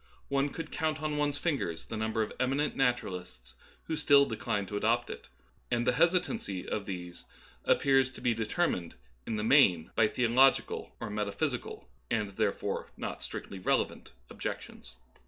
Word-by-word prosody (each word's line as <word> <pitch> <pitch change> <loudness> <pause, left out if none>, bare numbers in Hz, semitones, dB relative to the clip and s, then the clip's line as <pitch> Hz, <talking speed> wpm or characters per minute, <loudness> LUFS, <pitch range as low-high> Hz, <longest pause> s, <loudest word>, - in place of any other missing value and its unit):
One 140 +1 +1
could 165 +2 -7
count 155 -1 -1
on 150 -1 -1
one's 145 -1 +1
fingers 140 - -2
the - - -6
number 110 0 0
of 105 - -6
eminent 135 +4 +1
naturalists 90 - -2 0.3
who 160 - -3
still 140 -2 +6
decline 105 -4 -2
to 105 - -6
adopt 115 +3 +1
it, - - -9 0.4
and 120 -1 +1
the 125 - +4
hesitancy 170 - +1
of 100 -2 -3
these 90 -2 -6 0.4
appears 135 -1 +4
to - - -10
be 120 - +2
determined 110 - -1 0.3
in 115 - -1
the 105 - -2
main 105 - +5
by 110 - +5
theological 125 +4 +2
or 105 - -5
metaphysical, 105 - -3 0.2
and 105 -2 0
therefore 100 -1 -1
not - - -5
strictly 95 - -6
relevant, 90 - 0 0.2
objections. - - -6
115 Hz, 155 wpm, -31 LUFS, 100-140 Hz, 0.4 s, still